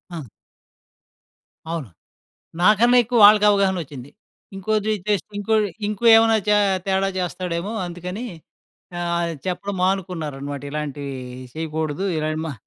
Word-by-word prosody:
ఆ! 160 - -5 1.5
అవును. 160 -10 -4 0.7
నాకన్నెక్కువ 240 +3 +4
వాళ్ళకావగాహనొచ్చింది. 195 - +3 0.5
ఇంకోటి 215 +2 -1 0.2
చేస్ 205 -4 +1
ఇంకో 220 +2 0 0.3
ఇంకో 210 +2 -5
ఏమైనా 225 0 +5
చా 210 - +5 0.3
తేడా 195 0 +1
చేస్తాడేమో 180 +2 -3
అందుకనీ 180 +6 -6 0.7
ఆహ్, 170 -1 -1
చెప్పడం 190 +2 -3
మానుకున్నారనమాట. 155 -7 -2
ఇలాంటివీ 145 -2 -5 0.4
చెయకూడదూ. 160 +2 -3
ఇలాంటి 155 0 -2
మా 155 - -4
180 Hz, 95 wpm, -22 LUFS, 155-205 Hz, 1.5 s, ఏమైనా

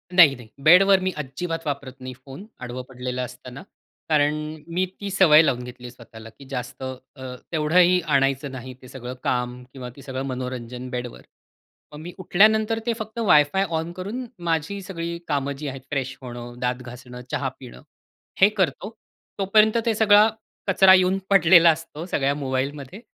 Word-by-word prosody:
नाही, 155 -7 +8
नाही. 120 -3 -13 0.2
बेडवर 190 +4 +7
मी 185 - 0
अजिबात 165 +4 -5
वापरत 140 -3 -4
नाही 130 0 -7
फोन, 140 +10 -10 0.2
आडवं 125 +1 -5
पडलेलं 125 0 -4
असताना. 125 +4 -8 0.5
कारण 150 -1 +3 0.4
मी 185 +2 +1 0.2
ती 200 - -4
सवय 165 -5 +6
लावून 125 -4 0
घेतली 125 0 -10
आहे 120 - -8
स्वतःला 115 -2 -13
की 140 - -13
जास्त 125 0 -6
अ, 130 0 -8 0.2
तेवढंही 175 +3 +4
आणायचं 140 -2 0
नाही 130 0 -8
ते 130 - -13
सगळं 125 0 -8
काम 125 0 -2
किंवा 125 -2 -7
ते 140 - -13
सगळं 130 0 -5
मनोरंजन 125 -1 -5
बेडवर. 125 -1 -6 0.7
मग 150 - -9
मी 175 +1 -8
उठल्यानंतर 215 +4 +3
ते 235 - +1
फक्त 220 +2 -6
WiFi 150 +6 +5 0.2
ऑन 165 +1 -5
करून 220 +8 -5 0.2
माझी 165 +5 -1
सगळी 170 -2 -5
कामं 140 -2 -1
जी 150 0 -6
आहेत 135 -1 -6
फ्रेश 135 -2 -3
होणं, 120 -1 -9
दात 125 0 0
घासणं, 125 0 -10
चहा 135 -1 -1
पिणं 125 -2 -12 0.6
हे 200 - +8
करतो. 190 +2 0 0.5
तोपर्यंत 215 +3 +4
ते 230 - +2
सगळा 210 0 +6 0.4
कचरा 190 0 +6
येऊन 185 +1 +4
पडलेला 170 -3 +7
असतो 165 0 -7
सगळ्या 140 -5 0
मोबाईलमध्ये. 140 - -4
145 Hz, 165 wpm, -23 LUFS, 125-180 Hz, 0.7 s, नाही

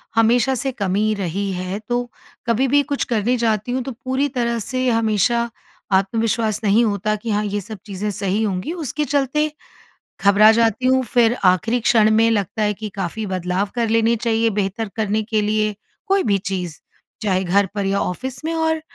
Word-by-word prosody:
हमेशा 235 +3 +3
से 270 +2 -2
कमी 210 -2 0
रही 195 +1 -2
है। 185 +2 -4
तो 245 0 -1 0.4
कभी 235 +3 +2
भी 285 +3 +4
कुछ 280 - 0
करने 235 +1 0
जाती 225 -1 0
हूँ, 255 +1 -1
तो 265 - -5
पूरी 260 +3 -1
तरह 235 -3 -1
से 255 +4 -2
हमेशा 230 +1 +1 0.4
आत्मविश्वास 215 +2 +1
नहीं 210 +3 +4
होता 215 0 0
कि 215 +2 -6
हाँ, 210 0 +1
ये 205 0 -2
सब 215 +3 -8
चीज़ें 205 0 -4
सही 200 +1 -1
होंगी 200 - -2
उसके 305 -3 -3
चलते 290 +2 0 0.7
घबरा 205 +2 +7
जाती 230 +2 +2
हूँ, 260 0 +3
फिर 235 -1 +2
आखिरी 200 +7 +3
क्षण 225 -2 +4
में 225 +1 +4
लगता 205 0 -1
है 210 0 +1
कि 215 +1 -6
काफ़ी 195 +3 -3
बदलाव 185 +1 -1
कर 235 -2 0
लेने 230 +1 +3
चाहिए 225 0 +1
बेहतर 205 +1 -2
करने 215 -1 0
के 215 0 0
लिए। 215 0 0 0.3
कोई 390 0 +2
भी 200 -2 +2
चीज़ 185 -4 -4 0.4
चाहे 190 -3 +1
घर 195 +3 +3
पर 200 -1 -1
या 195 +1 +1
ऑफ़िस 250 - -4
में 325 - -1
और 320 -1 0
220 Hz, 185 wpm, -20 LUFS, 200-240 Hz, 0.7 s, घबरा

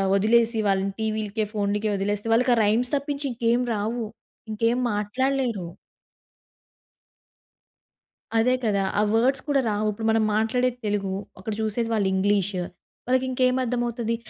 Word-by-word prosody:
వదిలేసి 230 +3 +3
వాళ్ళని 195 0 +1
టీవీ‌లకే, 215 0 -1
ఫోన్‌లకే 210 0 0
వదిలేస్తే 205 +2 -2
వాళ్ళకి 245 +3 +3
ఆ - - -4
రైమ్స్ 230 +4 +2
తప్పించి 285 0 -3
ఇంకేమి 235 +1 +1
రావు. 220 +3 -2 0.5
ఇంకేం 230 +3 +1 0.2
మాట్లాడలేరు. 240 0 -1 2.7
అదే 240 +3 +3
కదా! 200 -3 +1 0.2
ఆ - - +4
వర్డ్స్ 250 +5 +3
కూడా 285 -2 +2
రావు. 210 0 0
ఇప్పుడు 220 +2 -4
మనం 220 0 +2
మాట్లాడేది 245 +3 +1
తెలుగు. 205 -2 -1 0.3
అక్కడ 210 +3 -4
చూసేది 220 +2 -1
వాళ్ళు 205 -3 +1
ఇంగ్లీష్. 200 0 +1 0.5
వాళ్ళకి 255 +1 +1
ఇంకేమి 255 0 +2
అర్థమవుతుంది. 240 -1 -1
225 Hz, 125 wpm, -24 LUFS, 205-245 Hz, 2.7 s, ఆ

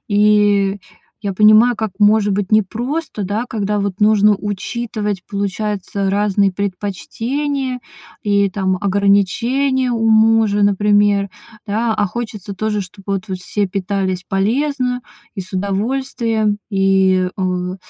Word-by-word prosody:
и 205 -1 +3 0.4
я 200 -2 -3
понимаю, 215 +4 +5
как 220 -1 -3
может 210 -1 +4
быть 200 +1 -2
непросто, 230 - -1
да, 210 +5 -2
когда 210 -2 -1
вот 200 -1 -3
нужно 210 0 +4
учитывать, 210 0 -4
получается, 200 -1 -2
разные 200 -1 +1
предпочтения 240 +8 -3 0.4
и, 200 -1 +2
там, 190 -1 -1
ограничения 230 +7 +1
у 225 -1 0
мужа, 220 -1 +4
например. 205 0 +3 0.4
Да, 220 +2 0
а 210 -1 +1
хочется 215 -2 -6
тоже, 210 +1 -2
чтобы 195 +1 -6
вот 190 - -3
все 200 +2 -1
питались 190 -1 -2
полезно 250 +5 0 0.3
и 200 - -4
с 185 +2 -9
удовольствием, 215 +2 -1
и, 190 -2 +2
э, 185 -1 -2
205 Hz, 115 wpm, -18 LUFS, 195-220 Hz, 0.4 s, понимаю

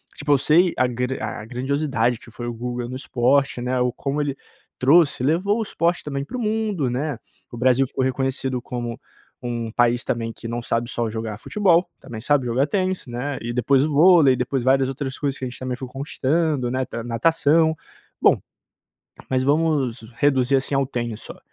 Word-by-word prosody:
tipo, 145 0 -2
eu - - +5
sei 165 +6 +4
a 130 - +3
grand 125 +2 -2
a - - -4
grandiosidade 125 -1 0
que 120 - -15
foi 120 +2 -6
o 120 - -3
Guga 120 +1 -4
no 130 - -5
esporte, 130 0 +1
né, 125 +1 -1
ou 125 0 +2
como 140 +3 -2
ele 140 -2 -2 0.4
trouxe 145 +1 +4
levou 185 - +1
o - - 0
esporte 175 -4 0
também 140 -2 -3
para 255 - -6
o - - -4
mundo, 215 - 0
né, 135 +2 -2 0.3
o 120 - -8
Brasil 130 +2 +3
ficou 130 - -2
reconhecido 130 -1 -1
como 120 -2 -5 0.4
um 120 -2 -3
país 120 0 +2
também 115 -1 -2
que 115 - -8
não 120 +1 -3
sabe 115 0 -1
só 120 -1 -2
jogar 110 -1 -4
futebol, 180 - +2
também 110 -3 -8
sabe 140 +1 +2
jogar 125 +4 +1
tênis, 185 +1 -1
né, 125 +4 -4
e 120 - -4
depois 130 +3 +3
o 155 - -2
vôlei 160 -3 +6
e - - -7
depois 125 0 -1
várias 135 +1 +3
outras 135 -1 -4
coisas 140 -2 -2
que - - -8
a - - -3
gente 125 - -11
também 130 -1 -3
foi 130 - -6
conquistando, 140 0 -1
né, 130 - -1
nat 115 0 -4
natação. 160 +6 +2 0.5
Bom, - - +5 0.9
mas 130 -1 +2
vamos 145 -4 +1 0.2
reduzir 135 -1 +3
assim 135 +1 -1
ao 135 0 +2
tênis, 120 -4 -4
só. - - -9
130 Hz, 200 wpm, -22 LUFS, 120-145 Hz, 0.9 s, vôlei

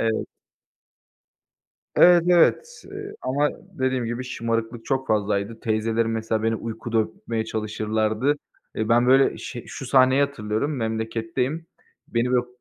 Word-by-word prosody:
Evet. 110 -1 0 1.7
Evet, 175 -1 +7
evet, 455 - +3
eee, 405 +1 -7
ama 145 +3 +1 0.3
dediğim 130 -2 0
gibi 120 +2 -3
şımarıklık 115 -2 -3
çok 130 -1 -1
fazlaydı. 105 +1 0
Teyzelerim 115 +1 0
mesela 110 -1 -1
beni 115 0 +1
uykuda 115 +1 -4
öpmeye 110 +1 -3
çalışırlardı. 110 +4 0 0.4
Eee, 110 +1 -2
ben 120 +1 +4
böyle 135 +1 +4
şe 120 -3 -7
şu 135 - -7
sahneyi 130 +1 +4
hatırlıyorum: 140 0 -1
Memleketteyim, 115 +6 -2 0.4
beni 120 +1 0
böyle 125 - +4
u 125 - -13
115 Hz, 130 wpm, -24 LUFS, 110-130 Hz, 1.7 s, Evet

